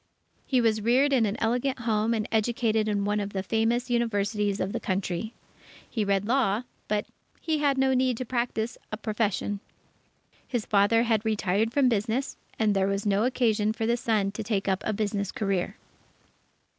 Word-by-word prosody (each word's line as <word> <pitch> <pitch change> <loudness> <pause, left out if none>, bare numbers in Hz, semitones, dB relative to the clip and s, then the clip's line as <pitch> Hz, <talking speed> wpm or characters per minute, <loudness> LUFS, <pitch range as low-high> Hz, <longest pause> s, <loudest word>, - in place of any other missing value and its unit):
He 255 -3 +3
was 220 -2 +2
reared 260 +6 +3
in 235 -5 +3
an 200 - -2
elegant 250 +4 0
home 225 0 +1
and 215 -1 -2
educated 220 -1 +1
in 205 -1 0
one 205 +1 +1
of 200 0 -4
the 190 -1 -2
famous 225 +4 +1
universities 210 -3 0
of 190 +2 -2
the - - -1
Country. 190 +3 -2 0.5
He 220 - -1
read 200 0 +1
law, 235 -3 +2 0.2
but 210 0 0 0.3
he 315 -2 -1
had 285 -2 +2
no 265 0 +3
need 255 -2 +2
to 255 - -4
practise 235 -1 -2
a 215 - -3
profession. 210 -2 -1 0.9
His 240 -4 -2
father 210 +3 +3
had 225 -3 +1
retired 215 0 +1
from 275 +1 +3
business, 230 +3 0 0.2
and 215 -2 +2
there 195 0 +2
was 200 +1 -1
no 205 +2 +2
occasion 220 -4 +1
for 225 0 -2
the 235 +1 +2
son 215 -4 0
to 210 - -5
take 205 -2 -1
up 190 -1 +1
a - - +1
business 205 -2 -2
career. 195 0 -2
220 Hz, 180 wpm, -27 LUFS, 205-235 Hz, 0.9 s, He